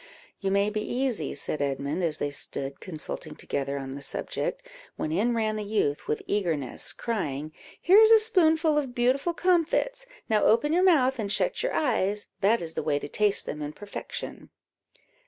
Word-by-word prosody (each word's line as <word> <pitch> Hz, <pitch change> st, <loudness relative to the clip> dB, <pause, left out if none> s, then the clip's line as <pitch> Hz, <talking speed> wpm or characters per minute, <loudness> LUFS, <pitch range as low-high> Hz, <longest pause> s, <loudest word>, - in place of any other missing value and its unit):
"You 195 Hz, -, -1 dB
may 200 Hz, +2 st, +2 dB
be 215 Hz, 0 st, -2 dB
easy," 240 Hz, -, -1 dB
said 145 Hz, +1 st, -2 dB
Edmund, 140 Hz, +4 st, -2 dB
as 160 Hz, -3 st, 0 dB
they 145 Hz, -, -2 dB
stood 140 Hz, -1 st, -1 dB
consulting 155 Hz, -2 st, -6 dB
together 140 Hz, -1 st, -3 dB
on 135 Hz, -1 st, -5 dB
the 140 Hz, -, -7 dB
subject, -, -, -3 dB, 0.3 s
when 155 Hz, -, -3 dB
in 225 Hz, +8 st, +1 dB
ran 215 Hz, -1 st, 0 dB
the 210 Hz, -, -3 dB
youth 205 Hz, -9 st, -1 dB
with 150 Hz, -, -2 dB
eagerness, 165 Hz, -10 st, -1 dB
crying 155 Hz, -, -3 dB, 0.3 s
"Here 380 Hz, +5 st, +6 dB
is 440 Hz, 0 st, +7 dB
a 450 Hz, -, +9 dB
spoonful 325 Hz, -8 st, +3 dB
of 260 Hz, -4 st, -5 dB
beautiful 270 Hz, +7 st, +1 dB
comfits; 370 Hz, +9 st, +1 dB, 0.2 s
now 215 Hz, -1 st, +2 dB
open 265 Hz, +8 st, +3 dB
your 355 Hz, -, +3 dB
mouth 270 Hz, -9 st, +4 dB
and 200 Hz, -2 st, -2 dB
shut -, -, +1 dB
your -, -, -1 dB
eyes 210 Hz, -7 st, 0 dB
that 210 Hz, +1 st, +2 dB
is 160 Hz, -1 st, -5 dB
the -, -, -2 dB
way 150 Hz, -2 st, 0 dB
to 145 Hz, -, -5 dB
taste 210 Hz, +6 st, +2 dB
them 150 Hz, -, -5 dB
in 150 Hz, 0 st, -4 dB
perfection." 205 Hz, +3 st, -7 dB
210 Hz, 180 wpm, -27 LUFS, -, 0.3 s, a